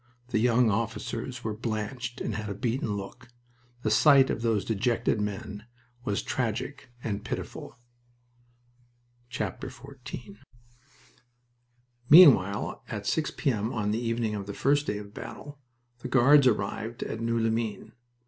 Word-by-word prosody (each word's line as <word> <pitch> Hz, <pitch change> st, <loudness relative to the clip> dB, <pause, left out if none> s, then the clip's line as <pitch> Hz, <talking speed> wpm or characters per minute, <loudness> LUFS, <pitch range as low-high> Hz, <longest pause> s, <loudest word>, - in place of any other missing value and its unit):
The 110 Hz, -, +1 dB
young 120 Hz, 0 st, +3 dB
officers 115 Hz, +3 st, -3 dB
were 110 Hz, -, -2 dB
blanched 115 Hz, +2 st, -4 dB
and -, -, -2 dB
had 110 Hz, 0 st, -4 dB
a 100 Hz, -, -4 dB
beaten 115 Hz, -2 st, -1 dB
look. 100 Hz, +6 st, -9 dB, 0.6 s
The 110 Hz, -, +1 dB
sight 135 Hz, +4 st, +6 dB
of -, -, -3 dB
those 115 Hz, -3 st, +1 dB
dejected 115 Hz, 0 st, 0 dB
men 105 Hz, +1 st, -5 dB, 0.4 s
was 100 Hz, -, -1 dB
tragic 130 Hz, +3 st, -3 dB
and 105 Hz, -2 st, -3 dB
pitiful. -, -, -6 dB, 1.5 s
XIV 125 Hz, -3 st, -7 dB, 1.7 s
Meanwhile, 130 Hz, -, +6 dB
at -, -, -5 dB
6 160 Hz, -1 st, 0 dB
P.M. 115 Hz, -6 st, 0 dB
on 105 Hz, -4 st, -1 dB
the 110 Hz, +2 st, -1 dB
evening 115 Hz, -1 st, -1 dB
of 100 Hz, -2 st, -5 dB
the 100 Hz, -, -6 dB
first 145 Hz, +2 st, +2 dB
day 105 Hz, -, -1 dB
of 105 Hz, 0 st, -9 dB
battle, 145 Hz, +4 st, -9 dB, 0.4 s
the 125 Hz, -, -6 dB
Guards 130 Hz, +2 st, +6 dB
arrived 110 Hz, +1 st, -1 dB
at 110 Hz, -, -5 dB
Noeux 115 Hz, 0 st, 0 dB
les 115 Hz, 0 st, +1 dB
Mines. 110 Hz, -2 st, -3 dB
115 Hz, 135 wpm, -28 LUFS, 105-125 Hz, 1.7 s, sight